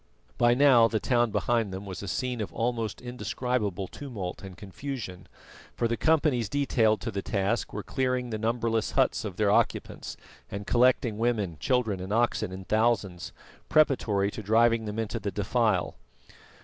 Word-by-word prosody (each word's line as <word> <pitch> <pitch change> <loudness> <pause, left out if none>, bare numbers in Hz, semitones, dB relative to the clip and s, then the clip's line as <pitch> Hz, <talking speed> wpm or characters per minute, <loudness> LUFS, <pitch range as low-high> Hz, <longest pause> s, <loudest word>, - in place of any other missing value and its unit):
By 120 0 +4
now 130 -4 +6
the 110 -1 -1
town 120 0 +2
behind 110 +1 0
them 95 +2 -6
was 95 -2 -6
a 100 - -6
scene 125 +3 -2
of 105 - -4
almost 115 -2 -2
indescribable 120 -5 -2
tumult 105 -11 -6
and 95 -2 -10
confusion, 100 -2 -7 0.5
for 120 - +1
the 115 - 0
companies 145 -7 +2
detailed 115 -7 +2
to 115 - -3
the 100 -1 -3
task 100 +3 -1
were 105 - -5
clearing 125 -2 -1
the 110 - -3
numberless 115 0 0
huts - - +2
of - - -5
their - - +2
occupants, - - 0 0.3
and 100 +1 -6
collecting 120 -2 +2
women, 110 -8 0
children 115 - 0
and 95 +2 -6
oxen 115 -4 +1
in 95 0 -8
thousands, 110 -5 0 0.4
preparatory 110 -10 +2
to - - -6
driving 115 +2 +3
them 105 0 -5
into 115 +1 -2
the 100 -1 -3
defile. 105 -1 0
115 Hz, 160 wpm, -28 LUFS, 100-120 Hz, 0.5 s, now